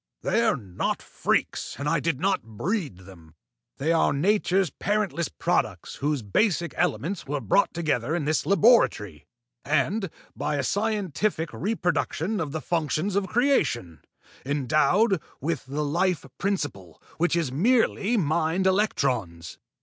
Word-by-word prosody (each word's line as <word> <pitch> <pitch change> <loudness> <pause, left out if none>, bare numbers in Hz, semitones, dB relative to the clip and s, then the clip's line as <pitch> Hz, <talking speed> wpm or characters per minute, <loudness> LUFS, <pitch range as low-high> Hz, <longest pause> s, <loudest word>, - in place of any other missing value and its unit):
"They 230 - +2
are 220 -8 +2
not 95 -7 -3
freaks, - - -1
and 140 - -3
I 160 +1 +2
did 155 -3 -1
not 190 +1 +1
breed 125 - -3
them. 85 -4 -15 0.4
They 150 +4 0
are 165 - +3
nature's 190 +1 +2
parentless 200 -4 -1
products 75 - -1
whose 145 -3 -1
basic 170 - +1
elements 170 +2 -1
were 145 +1 -1
brought 135 - +2
together 155 -4 -1
in 165 -4 -2
this 155 +1 0
laboratory, 115 - +3 0.4
and, 160 +8 0 0.3
by - - -2
a 140 - -1
scientific 200 - -1
reproduction 180 - -1
of 155 -4 -3
the 160 +1 -4
functions 170 +4 -1
of 200 -1 +1
creation, 185 - +1 0.4
endowed 155 - +2 0.2
with 150 -2 -3
the 150 +3 -2
life 175 +3 0
principle, 145 - -3 0.2
which 175 +1 +2
is 165 -7 0
merely 225 - +2
mind 165 +1 +1
electrons." 130 - 0
160 Hz, 135 wpm, -26 LUFS, 135-195 Hz, 0.4 s, are